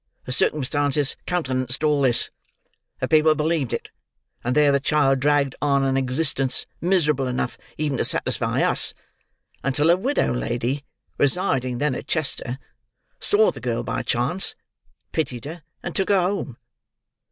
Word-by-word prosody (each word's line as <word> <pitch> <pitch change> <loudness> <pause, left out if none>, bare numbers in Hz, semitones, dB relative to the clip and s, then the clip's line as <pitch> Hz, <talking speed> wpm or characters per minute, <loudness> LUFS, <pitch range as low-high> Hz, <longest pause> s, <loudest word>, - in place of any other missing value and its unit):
The 125 - -5
circumstances 145 +1 +2
countenanced 130 -6 -1
all 150 -2 +3
this; 125 -3 +3 0.7
the - - -1
people 155 0 +4
believed 155 -4 0
it; 115 - -4 0.5
and 125 +2 -1
there 150 -1 +5
the 140 - +3
child 135 -2 +2
dragged 140 -1 +2
on 140 -2 +2
an 135 0 +1
existence, 135 0 +1 0.2
miserable 150 -7 +2
enough 125 -1 -2 0.2
even 145 -4 -1
to - - +2
satisfy - - 0
us, - - +2 0.7
until 145 +4 +3
a - - +6
widow 260 - 0
lady, 125 +3 -2 0.4
residing, 130 -5 +1
then, 145 +1 0
at - - -6
Chester, 135 -5 -1 0.6
saw 440 +3 +4
the - - -11
girl - - -2
by - - -2
chance, - - +1 0.6
pitied 130 -7 -3
her, 160 +3 -7 0.2
and 175 - -5
took 190 - 0
her 200 -2 +4
home. 180 - -2
145 Hz, 145 wpm, -23 LUFS, 130-155 Hz, 0.7 s, a